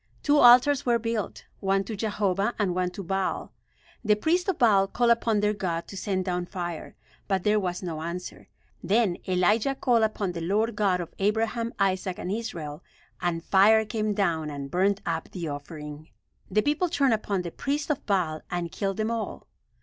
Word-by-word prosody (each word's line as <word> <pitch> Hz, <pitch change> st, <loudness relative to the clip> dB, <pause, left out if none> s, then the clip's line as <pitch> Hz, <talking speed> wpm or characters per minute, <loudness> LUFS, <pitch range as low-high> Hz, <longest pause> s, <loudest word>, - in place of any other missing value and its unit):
Two 290 Hz, 0 st, +4 dB
altars 250 Hz, +3 st, +7 dB
were 240 Hz, -1 st, +3 dB
built; 230 Hz, -2 st, -3 dB
one 195 Hz, 0 st, +1 dB
to 215 Hz, +3 st, -5 dB
Jehovah 205 Hz, 0 st, 0 dB
and 200 Hz, -4 st, 0 dB
one 180 Hz, 0 st, 0 dB
to 190 Hz, +2 st, -7 dB
Baal. 190 Hz, +2 st, -2 dB, 0.5 s
The 210 Hz, -2 st, +4 dB
priests 345 Hz, -, +1 dB
of 375 Hz, -, 0 dB
Baal 200 Hz, -5 st, +4 dB
called 240 Hz, +3 st, +2 dB
upon 230 Hz, -2 st, +2 dB
their 210 Hz, 0 st, +2 dB
god 175 Hz, -5 st, -3 dB
to -, -, -8 dB
send 190 Hz, -1 st, -2 dB
down 180 Hz, -1 st, -2 dB
fire; 175 Hz, -4 st, -5 dB, 0.3 s
but 190 Hz, -2 st, 0 dB
there 210 Hz, 0 st, +3 dB
was 180 Hz, -1 st, -3 dB
no 160 Hz, -3 st, -4 dB
answer. 170 Hz, +2 st, -6 dB, 0.4 s
Then 205 Hz, -3 st, +2 dB
Elijah 210 Hz, +8 st, +2 dB
called 240 Hz, -3 st, +2 dB
upon 215 Hz, -3 st, 0 dB
the 170 Hz, -1 st, -5 dB
Lord 210 Hz, +6 st, 0 dB
God 190 Hz, -4 st, +1 dB
of 170 Hz, -, -8 dB
Abraham, 225 Hz, +3 st, 0 dB
Isaac 190 Hz, -2 st, 0 dB
and 180 Hz, -, -4 dB
Israel, 175 Hz, -9 st, -5 dB, 0.4 s
and 170 Hz, -2 st, -1 dB
fire 215 Hz, +4 st, +5 dB
came 215 Hz, -1 st, -1 dB
down 165 Hz, -6 st, 0 dB
and 140 Hz, -1 st, -6 dB
burnt 195 Hz, +2 st, +2 dB
up 165 Hz, -1 st, -2 dB
the 175 Hz, -3 st, -5 dB
offering. 150 Hz, +1 st, -7 dB, 0.4 s
The 210 Hz, +2 st, +2 dB
people 300 Hz, +5 st, +1 dB
turned 275 Hz, -6 st, +2 dB
upon 200 Hz, -4 st, -1 dB
the 170 Hz, -, -5 dB
priests 290 Hz, -, -2 dB
of 290 Hz, -1 st, -2 dB
Baal 175 Hz, -6 st, 0 dB
and 175 Hz, -1 st, -3 dB
killed 195 Hz, -2 st, -2 dB
them 220 Hz, +1 st, -1 dB
all. 230 Hz, -1 st, -4 dB
195 Hz, 185 wpm, -26 LUFS, 180-225 Hz, 0.5 s, altars